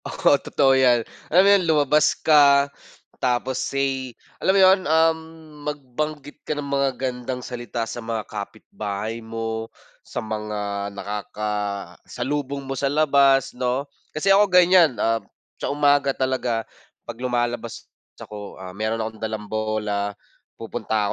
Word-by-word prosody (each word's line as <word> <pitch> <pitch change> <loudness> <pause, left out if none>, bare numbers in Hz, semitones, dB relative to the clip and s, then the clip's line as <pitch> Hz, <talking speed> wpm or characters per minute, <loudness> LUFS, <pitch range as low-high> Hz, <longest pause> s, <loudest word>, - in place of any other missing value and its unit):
Oo - - +2
totoo 135 -2 +3
yan. 125 -3 +4 0.2
Alam 180 +4 +6
mo - - +6
yun, 190 - -2
lumabas 150 0 +3
ka 140 -2 +5 0.5
tapos 125 +1 0
say 135 -3 -2 0.2
alam 190 - +3
mo - - +5
yun, 190 +1 +6
um, 160 0 +4 0.5
magbanggit 145 +1 -5
ka 155 - -4
ng 145 - -3
magagandang 130 -2 -2
salita 120 -2 -4
sa 120 - -6
mga 115 -2 -3
kapitbahay 105 +1 -6
mo, 115 0 -4 0.3
sa - - -11
mga 105 -2 -3
nakakasalubong 105 +7 -4
mo 135 - -3
sa 135 +1 -1
labas 140 -2 +3
'no. 125 +2 -1 0.2
Kasi 195 +6 +2
ako 205 +1 +5
ganyan, 180 - +5
ah, 115 +2 +1 0.4
sa - - -1
umaga 145 -1 +2
talaga 130 -3 -1 0.4
'pag 120 +1 -8
lumalabas 120 -2 -2 0.3
ako, 105 -1 -9
ah, 95 -1 -9
meron 110 +3 -2
akong 110 0 -8
dalang 110 -1 -4
bola, 105 -1 -2 0.4
pupunta 110 -2 -2
125 Hz, 130 wpm, -23 LUFS, 110-140 Hz, 0.5 s, Alam